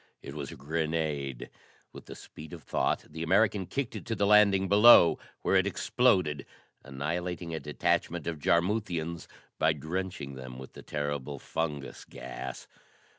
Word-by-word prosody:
It 70 - -8
was 70 -3 -6
a - - -9
grenade. 75 -3 -3 0.4
With - - -12
the - - -8
speed 80 +2 -12
of 85 -3 -9
thought, - - -1
the 80 +1 -8
American 95 +2 +2
kicked 140 -4 -3
it - - -6
to 115 - -1
the 100 - +1
landing 100 -2 +5
below, 100 -4 +7 0.2
where - - +2
it - - +4
exploded, 90 - +1 0.4
annihilating 85 +5 -4
a 80 - -2
detachment 75 +3 -1
of 85 -3 -3
Jarmuthians 85 -1 0 0.3
by 80 0 +3
drenching 80 -1 -4
them 65 -1 -9
with 65 0 -10
the - - -11
terrible 75 -1 -4
fungus 75 -1 -4
gas. 65 - -8
80 Hz, 150 wpm, -29 LUFS, 75-95 Hz, 0.4 s, below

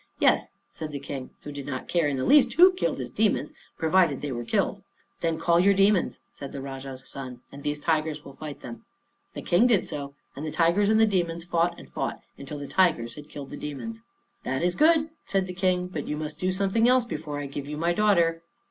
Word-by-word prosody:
"Yes," - - +3 0.2
said 155 - -6
the 140 - -4
King, 135 -2 -6
who 145 - -6
did 140 -1 -7
not 130 -2 -4
care 170 -4 +2
in 140 -2 -1
the 130 - -1
least 260 -5 +6
who 365 +5 +7
killed 365 - -1
his - - -5
demons, - - +1 0.2
provided 165 -3 +3
they 145 - -2
were 120 -1 -3
killed. 115 - 0 0.4
"Then 165 -1 0
call 170 +1 +3
your 200 +2 +5
demons," 195 -1 +3
said 140 - -8
the 140 - -6
Rajah's 135 -1 -7
son, 130 -3 -7
"and 140 - -10
these 150 0 -1
tigers 155 -1 -1
will 140 - -10
fight 150 -1 -8
them." 115 -2 -9 0.5
The - - -6
King 190 +8 +4
did 220 -7 +3
so, 140 -1 -6 0.2
and 140 - -6
the 155 - -2
tigers 175 +6 +3
and 220 0 +4
the 220 - +7
demons 170 -5 0
fought 170 0 0
and - - -12
fought - - -3 0.2
until 145 +2 -7
the 145 - -6
tigers 140 -9 +2
had 150 0 -11
killed 140 -2 -8
the - - -6
demons. 225 +11 -6 0.4
"That 130 +4 -2
is 175 0 +2
good," 315 - +4 0.2
said 195 -1 +1
the 180 - -6
King. 180 -1 +1
"But 160 -5 -5
you 150 - -2
must 155 0 -5
do 185 +1 +1
something 200 +5 +2
else 255 -1 +4
before 155 -7 -5
I 145 - -4
give 140 0 -6
you 150 0 -5
my 170 +2 +1
daughter. 170 -5 +3
165 Hz, 230 wpm, -26 LUFS, 140-190 Hz, 0.5 s, who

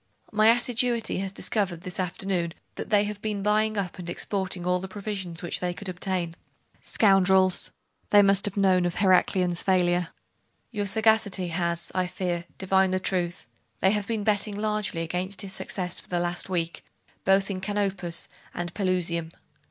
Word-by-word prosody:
'My 215 0 +4
assiduity 240 -2 +2
has 195 0 -2
discovered 190 -4 -1
this 180 0 -6
afternoon 180 -2 -1 0.2
that - - -6
they 205 -1 +4
have 205 0 -5
been 210 -2 -2
buying 215 +1 +2
up 190 -2 -3
and 175 -1 -6
exporting 190 -1 -2
all 180 0 +2
the 190 - -6
provisions 190 -4 -5
which 175 - -2
they 180 -1 -2
could 200 - -6
obtain.' 180 -2 -2 0.5
'Scoundrels! 190 -2 +3 0.4
Then 205 -1 +7
they - - +4
must 195 0 +3
have 205 -1 -2
known 185 -3 +4
of 175 - -4
Heraclian's 185 -2 +3
failure!' 180 -2 +2 0.6
'Your 205 -3 -2
sagacity 210 -3 +2
has, 170 0 -2
I 185 -1 0
fear, 175 -2 -3
divined 190 0 +2
the - - +1
truth. 180 -1 -1 0.3
They 190 - +4
have 210 -1 -1
been 225 -3 -1
betting 205 0 +1
largely 210 -5 -1
against 185 +5 -2
his 190 -1 -5
success 180 -2 -4
for - - -13
the 175 - -1
last 175 +1 -2
week, 170 -2 -2 0.4
both 195 +1 +3
in 185 - -3
Canopus 195 -4 -1 0.3
and 175 0 -4
Pelusium. 180 -4 0
190 Hz, 165 wpm, -26 LUFS, 175-205 Hz, 0.6 s, Then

